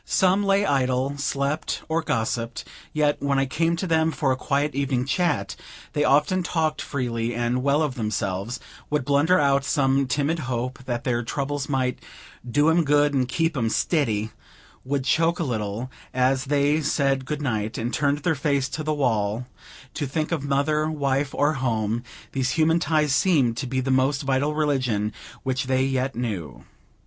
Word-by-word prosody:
Some 190 +1 +2
lay 200 0 +3
idle, 130 -2 +1
slept, 140 +2 -1
or 160 +1 0
gossiped; 115 -4 -2 0.3
yet, 150 -1 +1
when 140 -1 +1
I 135 - +2
came 165 +5 0
to 170 - -3
them 160 -2 +2
for 145 -4 0
a - - +2
quiet 140 +3 0
evening 135 -2 0
chat, 145 - 0 0.4
they 150 -1 +1
often 150 +6 +3
talked 160 -3 -1
freely 120 -3 -2
and 120 +1 0
well 140 +3 +2
of 150 -4 -1
themselves; 105 -1 -2 0.3
would 150 -3 0
blunder 145 +6 +3
out 140 -2 +3
some 135 -1 +2
timid 145 +5 0
hope 125 0 -3
that 120 -2 -3
their 120 -2 0
troubles 140 +3 -3
might 130 -2 0 0.5
"do 145 +5 +3
'em 165 +1 +4
good, 145 0 +3
and 130 -2 +1
keep 165 +4 0
'em 115 -4 0
stiddy;" 110 -7 0 0.5
would 135 +1 -1
choke 165 +5 +2
a - - -1
little, 115 -1 -3 0.2
as 130 +1 +2
they 145 +2 +2
said 140 -2 +1
good 150 +2 -4
night, 110 -4 -2
and 120 +2 -3
turned 145 -1 +1
their 170 - +2
faces 140 -2 0
to 155 +3 -4
the 155 0 0
wall 115 -4 0 0.5
to 145 -2 -3
think 155 +4 -2
of 160 -5 -1
mother, 145 +2 +1
wife, 140 -2 0
or 145 +2 +2
home, 115 -4 -1 0.3
these 130 -1 0
human 160 +1 +4
ties 155 -3 +1
seeming 150 -6 +3
to 130 +3 -4
be 130 +1 -1
the 135 +1 -1
most 135 +2 +2
vital 135 +2 0
religion 130 -9 0 0.3
which 130 0 -1
they 130 0 +1
yet 135 0 -1
knew. 100 - -4
140 Hz, 175 wpm, -24 LUFS, 125-150 Hz, 0.5 s, em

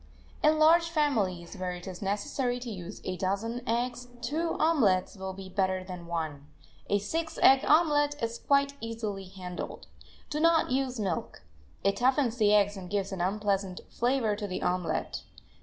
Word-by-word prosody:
In 310 +1 +4
large 335 +2 +5
families, 215 - 0
where 185 -2 -3
it 175 0 -8
is 185 -2 -7
necessary 225 +5 -1
to 240 -2 -5
use 185 -1 -8
a 185 0 -3
dozen 205 +6 -1
eggs, 245 +1 -1 0.2
two 330 +3 -1
omelets 225 - +3
will 190 -1 -5
be 190 0 -9
better 185 -1 0
than 180 -2 -8
one. 155 -4 -4 0.4
A 205 - +4
six 320 +11 -3
egg 265 0 +7
omelet 295 -2 +4
is 230 0 -3
quite 280 0 +2
easily 220 -4 -4
handled. 185 -1 -7 0.5
Do 300 - -1
not 330 -3 +4
use 255 -2 0
milk; 190 -6 -3 0.4
it 195 0 +2
toughens 255 -1 +2
the 210 -3 +4
eggs 205 -1 +4
and 180 -2 -8
gives 200 -1 -1
an 190 -2 -3
unpleasant 195 -1 -1
flavor 240 -3 +1
to 205 -1 -4
the 185 - -4
omelet. 180 -3 -1
210 Hz, 165 wpm, -29 LUFS, 185-265 Hz, 0.5 s, egg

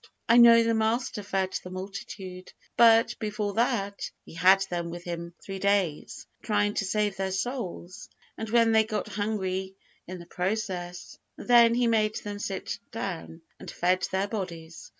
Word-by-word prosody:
I 230 - +6
know 235 -1 +8
the 230 0 +1
Master 220 +1 0
fed 195 -2 -2
the 180 - -8
multitude; 185 0 -8 0.2
but, 230 0 +6
before 210 -2 -3
that, 220 -4 -1 0.2
He - - -13
had 190 +3 +5
them 175 -3 -3
with 175 +1 -7
Him 170 -1 -6
three 195 -1 -6
days, 195 -6 -1 0.2
trying 205 -1 +1
to 200 - -1
save 205 0 0
their 190 0 -2
souls, 190 -4 -5 0.3
and 220 - -6
when 230 0 +4
they 220 0 +5
got 215 -1 -4
hungry 190 -3 -3 0.3
in 185 +1 -6
the 170 - -11
process, 180 -1 -4 0.2
then 235 -1 +5
He 245 0 +2
made 215 -2 +2
them 205 -1 -6
sit 195 -2 -4
down, 170 -6 -6 0.2
and - - -9
fed 185 +1 0
their 190 +1 -1
bodies. 170 -6 -6
200 Hz, 160 wpm, -27 LUFS, 185-220 Hz, 0.3 s, know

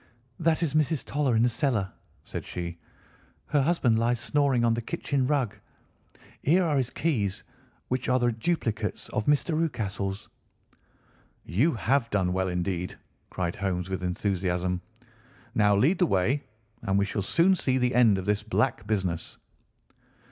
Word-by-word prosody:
"That 165 0 +2
is 150 -4 0
Mrs. 155 -1 +1
Toller 140 -4 0
in 110 - +4
the - - +5
cellar," 115 -6 0 0.3
said - - -6
she. 85 -1 -6 0.7
"Her 145 - +2
husband 135 -7 +2
lies 120 +1 +1
snoring 135 -1 +2
on 115 - +3
the 115 - -1
kitchen 130 +3 -1
rug. 135 -7 +1 0.9
Here 175 +6 +3
are 155 -3 +1
his 130 -2 0
keys, 110 - -1 0.4
which 130 0 -2
are 125 - +4
the 120 -1 +2
duplicates 115 -4 -2
of 105 - -2
Mr. 150 +3 +2
Rucastle's." 100 -11 -2 1.2
"You 120 - +2
have 120 +2 +1
done 95 -3 +1
well 95 0 0
indeed!" 90 0 -2 0.3
cried 90 -2 -2
Holmes 95 -2 -2
with 95 -1 -3
enthusiasm. 90 -1 -1 0.7
"Now 105 -1 +4
lead 150 - +3
the 180 - +4
way, 120 +9 +1 0.4
and 95 0 0
we 100 - +3
shall 100 +1 -2
soon 170 - +3
see 130 -7 0
the 125 -1 +1
end 115 -5 +5
of 95 - -4
this 105 0 +1
black 110 -1 0
business." 95 -6 -2
115 Hz, 155 wpm, -27 LUFS, 95-140 Hz, 1.2 s, the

